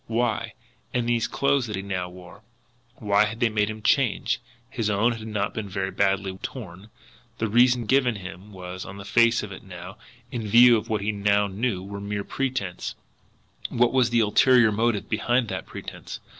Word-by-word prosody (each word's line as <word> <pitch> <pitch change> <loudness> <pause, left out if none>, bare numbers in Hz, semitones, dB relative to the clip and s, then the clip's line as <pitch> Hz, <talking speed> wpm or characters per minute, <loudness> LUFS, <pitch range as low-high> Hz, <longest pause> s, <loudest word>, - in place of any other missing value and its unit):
Why? 115 0 -1 0.4
And 120 -1 0
these 120 -1 +1
clothes 140 -3 +1
that 105 - -4
he 95 - -4
now 95 -2 -3
wore 90 +2 -13 0.5
why 105 -1 +2
had 110 +2 -5
they 120 -2 +3
made 105 -1 +1
him 110 -1 -7
change? 125 0 +2 0.3
His 110 -2 -2
own 105 +4 +2
had 110 -2 -6
not 105 -2 -2
been 105 -2 -5
very 95 0 -2
badly 95 -1 0
torn. 100 -4 -8 0.5
The 115 - -1
reason 120 +2 +4
given 130 0 +3
him 95 +1 -9
was, 95 -1 -7
on 95 - -9
the 100 - -9
face 115 +2 +3
of 105 - -7
it 95 - -9
now, 90 +1 -10 0.3
in 115 -5 -4
view 120 +3 +7
of 115 +1 -3
what 110 -2 0
he 105 +2 0
now 100 0 +2
knew, 100 -1 -2
mere 100 0 -4
pretence. 125 -10 -3 0.7
What 120 +1 +2
was 130 -2 +3
the 120 -1 +3
ulterior 115 +2 +5
motive 110 0 0
behind 120 +2 +1
that 95 -3 -5
pretence? - - -8
105 Hz, 185 wpm, -25 LUFS, 100-120 Hz, 0.7 s, view